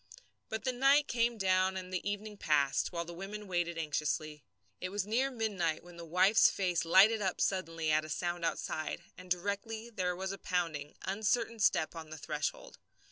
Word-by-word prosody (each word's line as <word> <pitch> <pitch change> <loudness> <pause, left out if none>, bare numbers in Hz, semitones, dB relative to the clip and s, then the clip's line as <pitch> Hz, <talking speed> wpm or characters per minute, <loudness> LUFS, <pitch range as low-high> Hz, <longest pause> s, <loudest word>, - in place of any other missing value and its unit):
But 220 0 -3
the 255 - +1
night 275 +3 +4
came 235 0 +1
down 190 -1 +2
and 185 0 -7
the 185 +2 -1
evening 205 +1 -4
passed, 145 -7 +1
while 170 -1 -3
the 170 - -8
women 200 +4 -6
waited 175 -2 -1
anxiously. 150 -1 -2 0.4
It 185 - -3
was 200 0 -2
near 245 +6 +1
midnight 200 -11 -1
when 175 0 -13
the 170 - -8
wife's 185 +6 +5
face 180 -3 0
lighted 200 +6 +6
up 190 -2 -1
suddenly 165 -4 0
at 155 0 +3
a 155 - -8
sound 175 +2 -2
outside, 155 -1 -2
and 180 0 -12
directly 205 +5 -2
there 180 -4 -1
was 190 +1 -3
a 195 - -6
pounding, 165 -5 -2
uncertain 220 +4 0
step 165 -5 +2
on 160 -1 -8
the 155 - -7
threshold. 150 -1 -4
185 Hz, 185 wpm, -33 LUFS, 165-210 Hz, 0.4 s, lighted